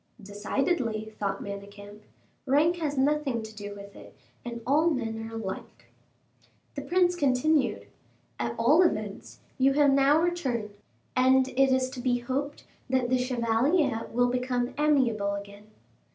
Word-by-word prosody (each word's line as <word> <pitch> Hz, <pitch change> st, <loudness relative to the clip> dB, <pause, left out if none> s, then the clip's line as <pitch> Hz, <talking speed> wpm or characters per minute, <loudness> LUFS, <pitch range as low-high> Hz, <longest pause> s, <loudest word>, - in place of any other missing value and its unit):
"Decidedly," 220 Hz, -, -2 dB
thought 195 Hz, -1 st, -2 dB
Manicamp, 205 Hz, +1 st, -9 dB, 0.5 s
"rank 305 Hz, +6 st, +3 dB
has 300 Hz, -4 st, -3 dB
nothing 275 Hz, -4 st, +1 dB
to 220 Hz, 0 st, -10 dB
do 205 Hz, -1 st, -7 dB
with 200 Hz, 0 st, -12 dB
it, -, -, -14 dB, 0.3 s
and 235 Hz, -1 st, -6 dB
all 300 Hz, +6 st, +3 dB
men 225 Hz, -6 st, -3 dB
are 225 Hz, -, -9 dB
alike." 200 Hz, -4 st, -7 dB, 0.8 s
The -, -, -5 dB
prince 360 Hz, 0 st, +2 dB
continued: 265 Hz, -, +1 dB, 0.5 s
"At 120 Hz, 0 st, -2 dB
all 285 Hz, +9 st, +5 dB
events, 215 Hz, -, -2 dB, 0.2 s
you 270 Hz, +1 st, +4 dB
have 285 Hz, -1 st, +4 dB
now 275 Hz, +2 st, +4 dB
returned, 265 Hz, -12 st, -1 dB, 0.4 s
and 260 Hz, +1 st, +4 dB
it 270 Hz, +1 st, +2 dB
is 260 Hz, 0 st, +2 dB
to 260 Hz, -, -8 dB
be 245 Hz, 0 st, +1 dB
hoped 270 Hz, +4 st, -4 dB, 0.3 s
that 255 Hz, -2 st, +1 dB
the 255 Hz, -, +3 dB
chevalier 250 Hz, +2 st, +1 dB
will 245 Hz, +1 st, +2 dB
become 250 Hz, 0 st, -1 dB
amiable 245 Hz, -9 st, +1 dB
again." 200 Hz, +1 st, -10 dB
250 Hz, 140 wpm, -27 LUFS, 215-280 Hz, 0.8 s, all